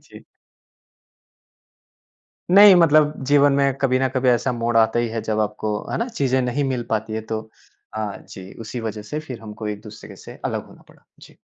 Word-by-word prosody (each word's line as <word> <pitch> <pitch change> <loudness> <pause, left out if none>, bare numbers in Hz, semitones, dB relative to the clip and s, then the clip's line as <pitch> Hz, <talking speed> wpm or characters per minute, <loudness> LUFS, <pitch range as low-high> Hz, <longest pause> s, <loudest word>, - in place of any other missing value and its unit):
जी। - - -16 2.3
नहीं, 200 +1 +9
मतलब 155 -3 +4
जीवन 145 0 +4
में 140 -1 +2
कभी 130 -2 +1
न 130 0 +1
कभी 130 0 +1
ऐसा 125 +1 +2
मोड़ 115 -1 -1
आता 110 +1 +3
ही 120 -1 0
है 115 0 -3
जब 110 0 -1
आपको, 105 0 -2
है - - -2
ना? 235 +2 -2
चीज़ें 130 - 0
नहीं 125 +3 -1
मिल 130 -3 -2
पाती 110 0 -2
हैं 110 0 -4
तो 110 -1 -3 0.5
हाँ 110 -2 -4
जी, 95 0 -11
उसी 115 +2 -6
वजह 110 -2 -5
से 150 +9 -5
फिर 130 -7 -9
हमको 110 0 -8
एक-दूसरे 105 +1 -9
से - - -12
अलग - - -3
होना - - -18
पड़ा। - - -22 0.2
जी। - - -16
120 Hz, 190 wpm, -21 LUFS, 110-140 Hz, 2.3 s, नहीं